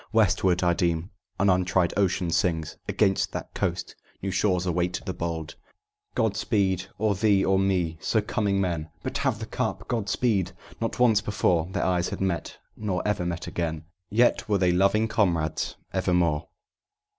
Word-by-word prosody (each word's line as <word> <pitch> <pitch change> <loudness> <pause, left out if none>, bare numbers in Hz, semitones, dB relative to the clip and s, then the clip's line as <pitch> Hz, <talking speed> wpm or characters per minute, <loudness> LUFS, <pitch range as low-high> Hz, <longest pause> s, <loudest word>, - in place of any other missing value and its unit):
"Westward, 95 -4 +3
I 85 -1 +4
deem: 85 +1 0 0.3
an 100 - +3
untried 90 -1 +2
ocean 95 -3 +1
sings 80 -2 0
Against 95 -3 +1
that - - -6
coast, - - -2 0.3
'New 95 - -1
shores 90 0 +1
await 90 0 0
the 95 - -2
bold.'" 85 -2 -4 0.6
"God 110 -3 +1
speed 95 -4 +1
or 105 -1 +2
thee 100 -1 +3
or 95 0 +3
me, 90 -4 0
so 110 +8 +2
coming 105 -1 0
men 85 -4 -1
But - - -3
have - - +1
the - - -5
Cup!" - - -3
"God 110 -5 -1
speed!" 105 -7 +1 0.3
Not 115 - -2
once 115 -4 +4
before 90 -6 +1
Their - - -1
eyes 90 -1 +1
had - - -5
met, 95 -3 -2 0.2
nor 105 -2 -2
ever 95 -4 0
met 85 -1 -3
again, 80 -2 -3 0.2
Yet 120 +1 +2
were 105 - +3
they 90 -2 +3
loving 100 +5 +3
comrades 85 -9 0 0.2
evermore. 90 -5 +1
95 Hz, 165 wpm, -26 LUFS, 85-100 Hz, 0.6 s, I